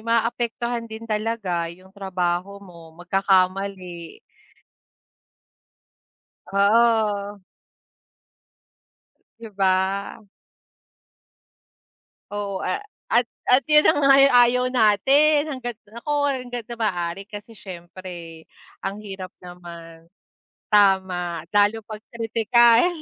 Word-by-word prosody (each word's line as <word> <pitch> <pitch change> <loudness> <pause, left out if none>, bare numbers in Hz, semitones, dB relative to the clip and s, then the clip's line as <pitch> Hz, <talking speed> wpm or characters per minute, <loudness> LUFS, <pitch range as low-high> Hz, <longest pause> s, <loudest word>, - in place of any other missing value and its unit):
maapektuhan 235 +1 -1
din 220 +1 -9
talaga 210 -6 -2
yung 185 +2 -18
trabaho 190 -1 -3
mo, 170 -3 -15
magkakamali. 185 - -1 2.3
Oo. 205 -1 +2 2.0
'Di 230 -1 -9
ba? 190 +1 0 2.1
Oo, 200 -2 -4
a - - -1 0.3
at 235 +1 +3 0.2
at 255 +4 +4
yun 300 0 +6
na - - +5
nga 280 - +2
ang 275 0 +6 0.2
ayaw 250 +1 +1
natin, 275 +7 +3
hangga't 245 -4 -5 0.2
naku 235 +7 -5 0.2
hanggat 245 -2 -5
sa 235 +1 -9
maaari, 185 -3 -2
kasi 210 +1 -11
siyempre 175 -2 -10 0.3
ang 200 +2 -5
hirap 195 -3 -8
naman 170 -2 -12 0.6
tama, 190 -5 +2
lalo 205 +2 +2
'pag 215 0 -9 0.2
kritikal. 230 +3 +4
205 Hz, 90 wpm, -23 LUFS, 185-230 Hz, 2.3 s, yun